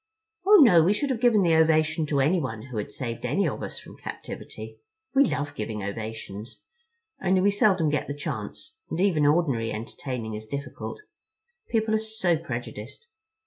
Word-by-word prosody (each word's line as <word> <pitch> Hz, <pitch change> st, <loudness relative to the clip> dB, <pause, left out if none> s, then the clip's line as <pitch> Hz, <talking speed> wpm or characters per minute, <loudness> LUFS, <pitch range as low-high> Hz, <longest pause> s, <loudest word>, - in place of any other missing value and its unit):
"Oh, 420 Hz, -, +9 dB
no, 180 Hz, -10 st, +7 dB
we 185 Hz, +5 st, +4 dB
should 275 Hz, +6 st, -1 dB
have 245 Hz, -, -1 dB
given 230 Hz, -5 st, +5 dB
the 170 Hz, -2 st, +3 dB
ovation 160 Hz, 0 st, +3 dB
to 145 Hz, -2 st, +1 dB
anyone 135 Hz, -8 st, 0 dB
who 125 Hz, -3 st, -7 dB
had 105 Hz, -, -3 dB
saved 115 Hz, +1 st, -5 dB
any 145 Hz, +11 st, +1 dB
of -, -, -3 dB
us -, -, -5 dB
from -, -, -11 dB
captivity. -, -, -8 dB, 0.3 s
We 280 Hz, +1 st, +6 dB
love 145 Hz, -, -2 dB
giving 105 Hz, -1 st, -4 dB
ovations. 110 Hz, -, -6 dB, 0.6 s
Only 190 Hz, 0 st, +3 dB
we 200 Hz, +2 st, +4 dB
so 205 Hz, -, +2 dB
seldom 185 Hz, -6 st, +2 dB
get 150 Hz, -, -1 dB
the 145 Hz, -, -4 dB
chance, 145 Hz, -, -6 dB
and 160 Hz, -, -3 dB
even 170 Hz, -7 st, +3 dB
ordinary 140 Hz, -8 st, +2 dB
entertaining 115 Hz, +1 st, -5 dB
is 110 Hz, 0 st, -7 dB
difficult. 140 Hz, -, -6 dB, 0.7 s
People 220 Hz, -1 st, +1 dB
are 220 Hz, -, +3 dB
so 220 Hz, -6 st, 0 dB
prejudiced. 170 Hz, -, -6 dB
155 Hz, 175 wpm, -26 LUFS, -, 0.7 s, Oh